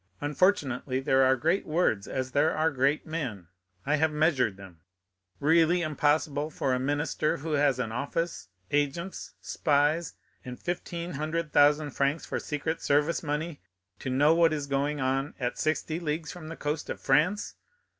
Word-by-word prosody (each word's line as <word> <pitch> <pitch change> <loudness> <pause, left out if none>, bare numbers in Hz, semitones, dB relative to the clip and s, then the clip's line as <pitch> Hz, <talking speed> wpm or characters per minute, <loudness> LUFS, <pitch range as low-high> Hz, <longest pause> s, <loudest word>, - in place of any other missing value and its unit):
Unfortunately, 145 -5 +1
there 135 0 +3
are 130 0 +5
great 165 +9 +1
words, 155 - 0
as 130 0 -3
there 145 +4 +2
are 160 +1 +2
great 140 +2 +1
men; 125 - -5 0.4
I 150 +2 +2
have 160 +1 +2
measured 150 - +1
them. 95 -4 -13 0.6
Really 165 +3 +4
impossible 150 0 +1
for 135 -4 -1
a 125 - +1
minister 145 +3 0
who 160 +4 -5
has 145 -3 +3
an 120 -3 -2
office, 155 +7 -3 0.2
agents, 145 +6 -2
spies, 150 +3 +1 0.3
and 125 -1 -8
fifteen 175 0 -4
hundred 155 +1 -3
thousand 145 +1 +4
francs 140 +4 0
for - - -3
secret 160 +2 -3
service 150 +3 +2
money, 150 +1 -3 0.4
to - - -4
know 145 +5 +4
what 165 -1 +4
is 145 -2 -2
going 140 +1 -1
on 135 +2 -1
at 125 -2 -2
sixty 155 +1 -1
leagues 155 -1 -3
from 175 -3 -9
the 165 - -7
coast 150 +1 -3
of - - -4
France! 155 +10 +1
150 Hz, 160 wpm, -28 LUFS, 135-160 Hz, 0.6 s, are